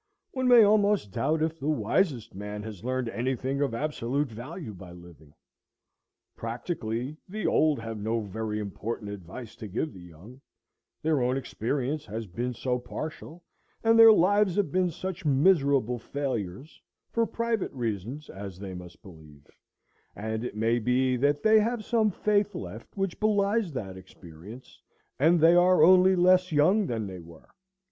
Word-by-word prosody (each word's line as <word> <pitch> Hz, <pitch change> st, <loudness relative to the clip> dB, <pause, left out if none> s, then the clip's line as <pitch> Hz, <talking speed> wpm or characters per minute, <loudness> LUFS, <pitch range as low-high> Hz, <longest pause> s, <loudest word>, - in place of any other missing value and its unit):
One 260 Hz, -1 st, -1 dB
may 245 Hz, -2 st, +8 dB
almost 205 Hz, -, +3 dB
doubt 155 Hz, +9 st, 0 dB
if 160 Hz, 0 st, -2 dB
the 145 Hz, +2 st, -2 dB
wisest 145 Hz, -, 0 dB
man 105 Hz, +2 st, -6 dB
has 105 Hz, -3 st, -9 dB
learned 130 Hz, 0 st, -2 dB
any 125 Hz, +3 st, -1 dB
thing 135 Hz, +3 st, -3 dB
of 135 Hz, -5 st, 0 dB
absolute 140 Hz, 0 st, -2 dB
value 120 Hz, -, -8 dB
by 90 Hz, -2 st, -11 dB
living. 85 Hz, -4 st, -16 dB, 1.0 s
Practically, 120 Hz, +2 st, -4 dB
the 215 Hz, +2 st, -5 dB
old 155 Hz, -2 st, +3 dB
have 115 Hz, -1 st, -6 dB
no 110 Hz, +3 st, -1 dB
very 105 Hz, +1 st, -4 dB
important 105 Hz, +1 st, -5 dB
advice 100 Hz, +5 st, -9 dB
to 110 Hz, -, -7 dB
give 115 Hz, -, -3 dB
the 95 Hz, -, -12 dB
young, 90 Hz, -, -14 dB, 0.6 s
their 155 Hz, -3 st, +1 dB
own 125 Hz, +2 st, +1 dB
experience 135 Hz, +3 st, -3 dB
has 110 Hz, +2 st, -5 dB
been 120 Hz, +6 st, -4 dB
so 125 Hz, 0 st, -1 dB
partial, 155 Hz, +6 st, -8 dB, 0.4 s
and 225 Hz, 0 st, +4 dB
their 225 Hz, 0 st, +10 dB
lives 205 Hz, -1 st, +3 dB
have 200 Hz, -8 st, 0 dB
been 185 Hz, +1 st, +2 dB
such 185 Hz, +3 st, -6 dB
miserable 140 Hz, -, +3 dB
failures, 130 Hz, -, -5 dB, 0.3 s
for 230 Hz, -1 st, +1 dB
private 230 Hz, -3 st, -2 dB
reasons, 120 Hz, +4 st, -4 dB
as 95 Hz, -2 st, -8 dB
they 95 Hz, -1 st, -7 dB
must 90 Hz, +1 st, -11 dB
believe; 80 Hz, -6 st, -15 dB, 0.7 s
and 110 Hz, +2 st, -4 dB
it 125 Hz, -, -5 dB
may 115 Hz, +2 st, +1 dB
be 125 Hz, +3 st, +1 dB
that 145 Hz, +3 st, +1 dB
they 220 Hz, 0 st, +6 dB
have 225 Hz, 0 st, -1 dB
some 225 Hz, -3 st, +2 dB
faith 205 Hz, +1 st, 0 dB
left -, -, -8 dB
which 195 Hz, -3 st, -2 dB
belies 210 Hz, -2 st, +1 dB
that 95 Hz, -7 st, -5 dB
experience, 95 Hz, +5 st, -13 dB, 0.4 s
and 165 Hz, +5 st, +4 dB
they 165 Hz, +2 st, +6 dB
are 175 Hz, -2 st, +5 dB
only 185 Hz, +2 st, +6 dB
less 185 Hz, 0 st, +4 dB
young 180 Hz, +7 st, +3 dB
than 115 Hz, -3 st, -2 dB
they 95 Hz, -2 st, -7 dB
were. 85 Hz, -1 st, -15 dB
130 Hz, 160 wpm, -27 LUFS, 110-180 Hz, 1.0 s, their